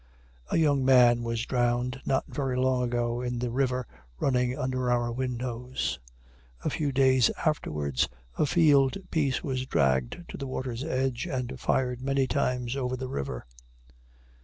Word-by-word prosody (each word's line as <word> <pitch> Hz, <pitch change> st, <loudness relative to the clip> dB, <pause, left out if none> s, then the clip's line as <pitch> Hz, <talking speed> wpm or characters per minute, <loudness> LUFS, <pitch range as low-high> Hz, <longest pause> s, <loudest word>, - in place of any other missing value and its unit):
A -, -, +1 dB
young 145 Hz, -4 st, +3 dB
man 125 Hz, -2 st, +6 dB
was 115 Hz, 0 st, -2 dB
drowned 125 Hz, +1 st, 0 dB
not 130 Hz, -1 st, +1 dB
very 135 Hz, -3 st, -2 dB
long 130 Hz, 0 st, +2 dB
ago 120 Hz, 0 st, -1 dB
in 125 Hz, -1 st, -2 dB
the 120 Hz, 0 st, -2 dB
river 130 Hz, 0 st, 0 dB, 0.3 s
running 125 Hz, -1 st, +1 dB
under 130 Hz, -1 st, -1 dB
our 120 Hz, -1 st, +1 dB
windows. 125 Hz, 0 st, -3 dB, 0.7 s
A -, -, +1 dB
few 150 Hz, -3 st, -1 dB
days 130 Hz, -2 st, +4 dB, 0.2 s
afterwards 75 Hz, -, 0 dB, 0.3 s
a 150 Hz, -, +1 dB
field 140 Hz, -4 st, +4 dB
piece 140 Hz, -5 st, +1 dB
was 130 Hz, -2 st, -2 dB
dragged 65 Hz, -, +1 dB
to -, -, -7 dB
the 135 Hz, -, -5 dB
water's 130 Hz, -1 st, -4 dB
edge, 130 Hz, -1 st, -1 dB
and 130 Hz, -4 st, -3 dB
fired 125 Hz, -1 st, 0 dB
many 135 Hz, 0 st, +1 dB
times 125 Hz, -3 st, -1 dB
over 130 Hz, -2 st, -2 dB
the 130 Hz, 0 st, -4 dB
river. 65 Hz, -, -4 dB
130 Hz, 150 wpm, -28 LUFS, 120-135 Hz, 0.7 s, man